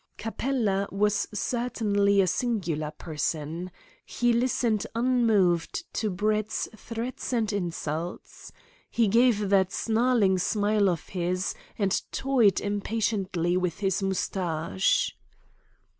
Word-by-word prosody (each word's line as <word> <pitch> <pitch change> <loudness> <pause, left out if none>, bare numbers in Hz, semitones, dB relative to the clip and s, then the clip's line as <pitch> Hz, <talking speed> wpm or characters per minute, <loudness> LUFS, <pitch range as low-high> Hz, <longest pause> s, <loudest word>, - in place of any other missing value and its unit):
Capella 220 -4 -1
was 205 +1 +1
certainly 210 -3 +1
a - - +3
singular 175 -7 -1
person. 155 +2 -4 0.3
He 240 -1 +1
listened 235 -3 +1
unmoved 225 -8 +2
to 220 - -1
Brett's 215 +3 -1
threats 230 +5 -5
and 225 -4 0
insults. 170 -3 -4 0.4
He 230 -2 +2
gave 220 -1 +3
that 190 -2 +4
snarling 225 -4 +2
smile 205 +1 +2
of 170 -3 -3
his, 180 0 -1 0.2
and 195 -3 +1
toyed 250 -7 +3
impatiently 200 -4 -1
with 180 -3 -1
his 195 -1 0
moustache. 170 - 0
200 Hz, 100 wpm, -27 LUFS, 180-225 Hz, 0.4 s, that